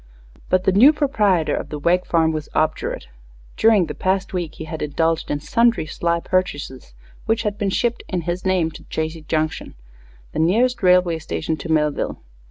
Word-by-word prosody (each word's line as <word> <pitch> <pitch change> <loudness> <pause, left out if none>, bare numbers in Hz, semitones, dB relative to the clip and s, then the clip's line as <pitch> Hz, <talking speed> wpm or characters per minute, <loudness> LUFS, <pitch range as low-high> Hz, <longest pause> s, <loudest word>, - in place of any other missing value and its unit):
But 185 0 +2
the 190 - +3
new 230 +10 +7
proprietor 210 - +1
of - - -5
the 150 - -5
Wegg 175 +5 +1
farm 160 -1 +2
was 155 -1 -5
obdurate. 155 - -1 0.5
During 220 -5 +4
the 150 - -6
past 190 +3 -1
week 175 -3 -3
he - - -7
had 160 0 -6
indulged 160 +2 0
in 145 - -1
sundry 230 +1 +2
sly 170 +2 -1
purchases, 145 - -3 0.3
which 225 +1 +1
had 210 -2 -1
been 205 -1 -1
shipped, 235 +4 0
in 180 -2 -1
his 175 +2 -3
name 185 -4 +1
to - - -12
Chazy 160 +1 -4
Junction, 155 0 -2 0.6
the - - -4
nearest 235 +9 +2
railway 180 -3 +3
station 160 0 -3
to 160 - -5
Millville. 150 -2 0
170 Hz, 180 wpm, -21 LUFS, 160-195 Hz, 0.6 s, new